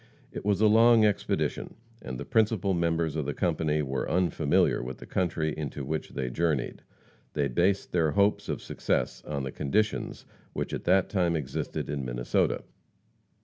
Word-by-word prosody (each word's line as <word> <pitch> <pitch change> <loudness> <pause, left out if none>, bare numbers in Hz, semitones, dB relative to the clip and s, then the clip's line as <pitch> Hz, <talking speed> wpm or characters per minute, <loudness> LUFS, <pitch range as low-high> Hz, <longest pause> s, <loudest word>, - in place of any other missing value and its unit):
It - - -6
was 100 -1 +1
a - - +6
long 115 +1 +6
expedition, 105 -2 -1 0.3
and 65 0 -6
the - - -5
principal 110 -3 +2
members 85 -2 0
of 75 -3 -2
the 70 - -2
company 80 -3 0
were 65 -1 -2
unfamiliar 90 -1 +2
with 65 +1 -6
the - - -11
country 80 -4 -1
into 75 -2 -5
which 80 +3 -3
they 65 - -3
journeyed. 75 -2 -1 0.5
They 70 -2 +1
based 90 +9 +1
their 80 -4 +2
hopes 100 +1 +2
of - - -3
success - - -2
on 70 -2 -3
the 65 - -4
conditions 105 +10 -1 0.3
which - - -3
at - - -4
that 95 +2 +4
time 90 -4 +1
existed 70 -4 -3
in 70 -2 -3
Minnesota. - - 0
80 Hz, 165 wpm, -28 LUFS, 70-95 Hz, 0.5 s, a